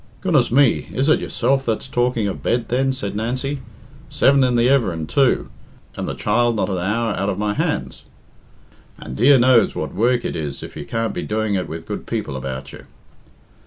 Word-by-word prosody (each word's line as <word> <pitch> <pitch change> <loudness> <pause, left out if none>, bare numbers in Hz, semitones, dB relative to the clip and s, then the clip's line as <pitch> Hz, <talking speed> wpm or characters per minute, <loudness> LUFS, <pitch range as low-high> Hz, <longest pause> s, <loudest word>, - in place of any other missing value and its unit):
"Goodness 155 -10 +2
me, 130 0 +3
is 135 +4 +1
it - - +4
yourself 135 0 0
that's 115 +1 -2
talking 120 -4 0
of 100 - -4
bed, 120 -1 -1
then?" 135 +2 +1
said 105 -6 -5
Nancy. 130 +6 -2 0.5
"Seven 135 - +4
in 125 -1 +2
the 120 0 +3
everin', 105 - +1
too, 135 - +1 0.4
and - - -4
the - - -4
child 120 +2 +1
not 105 - -1
an 95 -2 -1
hour 105 +5 0
out 100 +1 -1
of 95 - -2
my 105 0 -1
hands? - - -2 1.0
And 65 - -8
dear 135 - +6
knows 125 -1 +4
what - - -4
work 120 +5 +1
it - - -3
is 75 -4 -5
if - - -9
you 75 - -6
can't 115 -1 -2
be - - -3
doing 110 -1 -1
it 95 -2 -1
with 80 0 -7
good - - -6
people 70 - -3
about 65 0 -6
you." - - -12
115 Hz, 200 wpm, -20 LUFS, 100-130 Hz, 1.0 s, dear